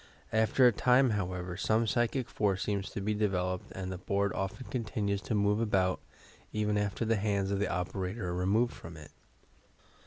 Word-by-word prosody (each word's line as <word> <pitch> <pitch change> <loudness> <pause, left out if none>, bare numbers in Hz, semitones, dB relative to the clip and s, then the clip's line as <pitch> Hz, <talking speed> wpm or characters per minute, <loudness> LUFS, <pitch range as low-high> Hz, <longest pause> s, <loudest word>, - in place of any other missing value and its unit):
After 110 +4 +4
a 120 - +8
time, 125 +3 +4
how 100 -4 -1
ever, 90 0 -5
some 110 +4 +1
psychic 120 +2 0
force 100 -2 0
seems 100 -2 -2
to 100 - -5
be 105 +2 0
developed 95 -3 -1
and 95 0 -5
the 90 - -5
board 100 +1 0
often 95 +6 -4
continues 105 -4 -2
to 110 - -2
move 105 +1 +2
about, 95 -4 +1 0.5
even 105 -1 0
after 105 +2 -1
the 115 0 +2
hands 100 -1 0
of 100 - 0
the 105 - +1
operator 90 +3 -3
are - - -2
removed 100 +7 +1
from 80 0 -10
it. 75 -1 -12
100 Hz, 185 wpm, -31 LUFS, 95-110 Hz, 0.5 s, a